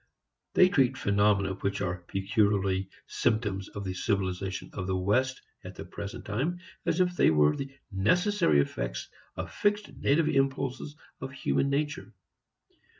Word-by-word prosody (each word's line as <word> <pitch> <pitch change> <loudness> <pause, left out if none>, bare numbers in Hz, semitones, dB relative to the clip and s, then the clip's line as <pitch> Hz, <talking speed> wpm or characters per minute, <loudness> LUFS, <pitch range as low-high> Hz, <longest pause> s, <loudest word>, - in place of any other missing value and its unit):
They 185 - +7
treat 135 -6 +2
phenomena 100 -2 +2
which 100 +1 -2
are 90 -2 -1
peculiarly 95 -1 +1 0.2
symptoms 105 -5 -1
of 100 - -6
the 95 -1 -3
civilization 95 -1 -2
of 95 -2 -4
the 95 -1 0
West 130 +8 +1 0.2
at - - -9
the - - -7
present - - -7
time 135 - -1 0.3
as - - +1
if 180 -1 +2
they - - +5
were 75 -1 +4
the 135 0 -5 0.2
necessary 140 - +3
effects - - -4 0.3
of - - -5
fixed 205 0 0
native 155 +3 +2
impulses 135 +1 0 0.2
of 135 +1 -6
human 140 0 0
nature. 140 -7 -2
105 Hz, 145 wpm, -29 LUFS, 95-140 Hz, 0.3 s, They